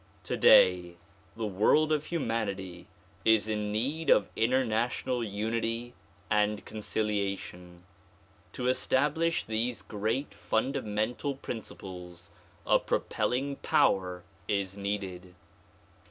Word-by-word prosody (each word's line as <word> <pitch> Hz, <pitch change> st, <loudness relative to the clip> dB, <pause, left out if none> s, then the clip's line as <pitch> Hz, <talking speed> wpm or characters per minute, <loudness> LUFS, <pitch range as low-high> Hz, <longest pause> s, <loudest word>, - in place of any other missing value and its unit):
Today 90 Hz, -1 st, +5 dB, 0.4 s
the 115 Hz, -, -2 dB
world 110 Hz, +10 st, +3 dB
of 155 Hz, -1 st, +1 dB
humanity 100 Hz, -, -3 dB, 0.4 s
is 110 Hz, -1 st, +4 dB
in 105 Hz, -1 st, -1 dB
need 140 Hz, +10 st, -1 dB
of 100 Hz, -, +5 dB
international 120 Hz, +1 st, +1 dB
unity 115 Hz, +3 st, -2 dB, 0.3 s
and 105 Hz, +1 st, +1 dB
conciliation. 100 Hz, -5 st, -3 dB, 0.7 s
To 125 Hz, -, -3 dB
establish 150 Hz, +6 st, +1 dB
these 115 Hz, +2 st, -2 dB
great 110 Hz, +4 st, -2 dB
fundamental 110 Hz, +3 st, -1 dB
principles 90 Hz, -8 st, -8 dB, 0.3 s
a -, -, +4 dB
propelling 135 Hz, +3 st, -1 dB
power 90 Hz, -2 st, +2 dB, 0.2 s
is 100 Hz, -2 st, -1 dB
needed. 95 Hz, -3 st, -4 dB
110 Hz, 90 wpm, -29 LUFS, 100-125 Hz, 0.7 s, Today